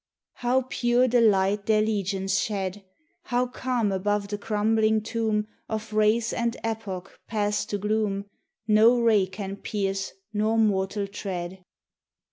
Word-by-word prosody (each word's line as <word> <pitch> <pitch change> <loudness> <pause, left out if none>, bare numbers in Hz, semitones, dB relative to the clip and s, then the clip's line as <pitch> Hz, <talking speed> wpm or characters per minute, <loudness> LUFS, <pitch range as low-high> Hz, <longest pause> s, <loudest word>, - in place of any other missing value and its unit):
How 250 +2 +1
pure 245 0 +2
the 245 0 +3
light 200 -1 +3
their 215 -1 +4
legions 195 -2 0
shed! 200 -1 -3 0.4
How 245 -3 +1
calm 245 -4 -1
above 200 +1 -1
the 205 - -2
crumbling 215 +1 +1
tomb 220 -2 0 0.2
Of 220 0 -4
race 215 +2 +2
and 235 +1 -1
epoch 210 -5 -5
passed 210 -2 -1
to 205 - -1
gloom 205 -1 -1 0.4
No 225 +3 +6
ray 220 -5 +4
can 195 +1 -6
pierce 195 -2 -2 0.2
nor 215 +2 +1
mortal 200 -2 +1
tread! 190 -2 -6
210 Hz, 130 wpm, -26 LUFS, 200-225 Hz, 0.4 s, No